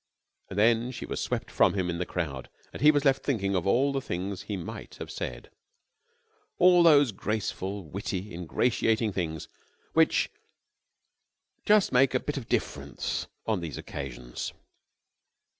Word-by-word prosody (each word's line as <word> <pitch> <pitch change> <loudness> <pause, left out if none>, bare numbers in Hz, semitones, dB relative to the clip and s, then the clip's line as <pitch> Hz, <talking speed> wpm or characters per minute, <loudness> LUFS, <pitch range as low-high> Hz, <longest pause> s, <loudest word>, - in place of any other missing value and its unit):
And 95 - -7
then 115 +3 +4
she 125 - -6
was - - -4
swept - - -3
from - - +3
him 95 -3 0
in 85 -1 -2
the 90 - -2
crowd 70 -7 -4 0.2
and - - -8
he 150 - +7
was 145 -1 +3
left 135 0 +4
thinking 100 -8 0
of 90 -1 0
all 135 +7 +3
the 135 - -1
things 95 -1 -4
he 105 - -4
might 85 - -7
have - - -7
said - - -6 1.1
all 180 0 +6
those 145 -6 +6
graceful, 100 -1 -3
witty, 95 +3 -5
ingratiating 110 +5 +1
things 80 -5 -3 0.5
which - - +3 1.4
just 210 -1 +5
make 130 0 +4
a - - +4
bit 145 +2 -4
of 130 - -6
difference - - -2 0.2
on 110 -4 0
these 80 -3 -5
occasions. 60 -3 -6
105 Hz, 150 wpm, -28 LUFS, 90-130 Hz, 1.4 s, he